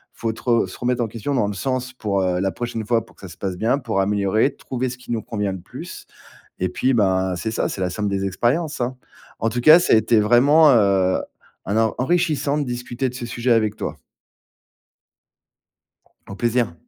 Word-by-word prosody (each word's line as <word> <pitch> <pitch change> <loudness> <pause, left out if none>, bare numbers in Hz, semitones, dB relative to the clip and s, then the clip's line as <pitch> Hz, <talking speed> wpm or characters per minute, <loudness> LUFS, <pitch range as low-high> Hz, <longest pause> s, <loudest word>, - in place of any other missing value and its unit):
Il - - -25
faut 115 -1 -1
te - - -12
re 115 -5 +2
se 90 - -10
remettre 125 0 0
en 115 - -2
question 115 +6 -4
dans 105 -5 +1
le 105 - -3
sens 130 +4 -3
pour, 100 -6 -1
heu, 90 -1 0
la 95 +1 0
prochaine 115 -2 -4
fois 115 -1 +1
pour - - -22
que - - -21
ça 95 - -8
se 85 - -13
passe 95 -2 -3
bien, 115 +6 +1
pour 115 -8 -1
améliorer, 105 +6 +1
trouver 130 0 -3
ce 125 - -7
qui 125 - -10
nous 115 -2 -1
convient 105 -3 -3
le 95 - -6
plus. - - -10 0.5
Et 90 - 0
puis, 130 +6 0
bah, 95 -3 +1
c'est 110 +6 -3
ça, 110 - -1
c'est - - -6
la 90 -1 0
somme 105 +3 -2
des 100 0 -1
expériences, 135 - -1
hein. 125 +1 -2 0.4
En 115 - +1
tout 120 +2 -2
cas, 155 +6 +8
ça 175 - +3
a - - +7
été 110 0 +3
vraiment, 140 +8 +5
heu, 100 -5 +3 0.5
un 100 - -2
en 110 -1 +2
enrichissant 155 0 +1
de 145 - 0
discuter 125 +1 -3
de 125 - -9
ce 125 -1 -6
sujet 120 +1 0
avec 110 -2 +2
toi. - - -5 2.3
Au 100 - -8
plaisir. 120 -5 0
115 Hz, 220 wpm, -21 LUFS, 100-125 Hz, 2.3 s, cas